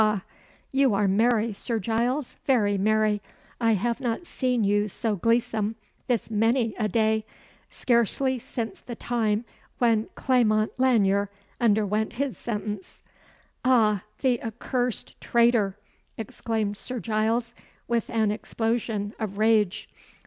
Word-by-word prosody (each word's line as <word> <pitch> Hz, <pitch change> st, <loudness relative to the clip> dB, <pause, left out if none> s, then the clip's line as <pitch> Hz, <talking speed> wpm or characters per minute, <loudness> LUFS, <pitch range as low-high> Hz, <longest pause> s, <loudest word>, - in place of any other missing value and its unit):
ha! 210 Hz, -3 st, +2 dB, 0.5 s
You 270 Hz, -5 st, +3 dB
are 200 Hz, 0 st, +2 dB
merry, 225 Hz, +2 st, +2 dB
Sir 230 Hz, +3 st, -3 dB
Giles, 235 Hz, +6 st, -1 dB
very 215 Hz, -7 st, +3 dB
merry; 215 Hz, +1 st, +2 dB, 0.4 s
I 230 Hz, -2 st, +3 dB
have 235 Hz, +5 st, -1 dB
not 245 Hz, +6 st, -2 dB
seen 250 Hz, -7 st, 0 dB
you 205 Hz, +1 st, +2 dB
so 215 Hz, +2 st, -2 dB
gleesome 225 Hz, +1 st, +1 dB, 0.3 s
this 235 Hz, -3 st, -1 dB
many 225 Hz, +1 st, +2 dB
a 215 Hz, -, +2 dB
day 220 Hz, +1 st, +2 dB, 0.5 s
scarcely 250 Hz, +2 st, +1 dB
since 225 Hz, -3 st, -5 dB
the 240 Hz, -, -7 dB
time 225 Hz, -2 st, 0 dB, 0.3 s
when 225 Hz, -3 st, +2 dB
Clement 220 Hz, -4 st, +2 dB
Lanyere 205 Hz, -6 st, +3 dB, 0.3 s
underwent 215 Hz, -1 st, +2 dB
his 270 Hz, +2 st, -2 dB
sentence." 210 Hz, -3 st, -5 dB, 0.6 s
"Ah! 220 Hz, -6 st, +4 dB, 0.2 s
the 250 Hz, -3 st, +2 dB
accursed 245 Hz, +1 st, -3 dB
traitor!" 235 Hz, -5 st, +3 dB, 0.4 s
exclaimed 220 Hz, -1 st, -3 dB
Sir 250 Hz, +2 st, -5 dB
Giles, 225 Hz, +2 st, 0 dB, 0.3 s
with 235 Hz, -2 st, 0 dB
an 220 Hz, -2 st, +1 dB
explosion 225 Hz, -1 st, -2 dB
of 205 Hz, -3 st, -4 dB
rage. 215 Hz, -3 st, +2 dB
225 Hz, 120 wpm, -26 LUFS, 210-240 Hz, 0.6 s, Ah